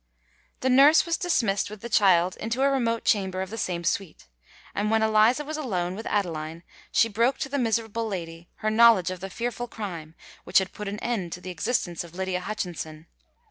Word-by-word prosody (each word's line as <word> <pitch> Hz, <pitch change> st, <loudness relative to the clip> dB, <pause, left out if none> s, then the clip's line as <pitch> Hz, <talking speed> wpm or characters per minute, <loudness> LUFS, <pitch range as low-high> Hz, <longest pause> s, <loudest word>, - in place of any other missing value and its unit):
The 260 Hz, -, +1 dB
nurse 280 Hz, +5 st, +7 dB
was 335 Hz, -1 st, 0 dB
dismissed 225 Hz, -, 0 dB
with 210 Hz, -1 st, -10 dB
the 235 Hz, -, -5 dB
child 185 Hz, -5 st, +4 dB
into 235 Hz, +4 st, -2 dB
a 275 Hz, -, +4 dB
remote 230 Hz, -4 st, 0 dB
chamber 190 Hz, -3 st, +1 dB
of 190 Hz, -, -9 dB
the 225 Hz, -, -5 dB
same 175 Hz, -4 st, -2 dB
suite; 185 Hz, 0 st, -2 dB, 0.5 s
and 210 Hz, +1 st, -1 dB
when 220 Hz, 0 st, +2 dB
Eliza 220 Hz, +6 st, +3 dB
was 310 Hz, +1 st, -4 dB
alone 185 Hz, -, -2 dB
with 220 Hz, +4 st, -6 dB
Adeline, 165 Hz, -4 st, -2 dB, 0.3 s
she 230 Hz, -, +4 dB
broke 230 Hz, +5 st, +1 dB
to 275 Hz, -, -4 dB
the 280 Hz, +1 st, -1 dB
miserable 225 Hz, -1 st, -1 dB
lady 170 Hz, -4 st, -6 dB, 0.2 s
her 215 Hz, -, +2 dB
knowledge 220 Hz, -5 st, +5 dB
of 185 Hz, -, -6 dB
the 195 Hz, +2 st, -6 dB
fearful 240 Hz, +4 st, -4 dB
crime 170 Hz, -9 st, -7 dB, 0.3 s
which 180 Hz, -, +2 dB
had 190 Hz, -1 st, +2 dB
put 210 Hz, -, -6 dB
an 200 Hz, +1 st, -4 dB
end 200 Hz, -8 st, -2 dB
to -, -, -6 dB
the 185 Hz, +1 st, -7 dB
existence 175 Hz, -2 st, -1 dB
of 170 Hz, 0 st, -13 dB
Lydia 190 Hz, -1 st, -2 dB
Hutchinson. 175 Hz, -6 st, -5 dB
205 Hz, 200 wpm, -26 LUFS, 180-230 Hz, 0.5 s, nurse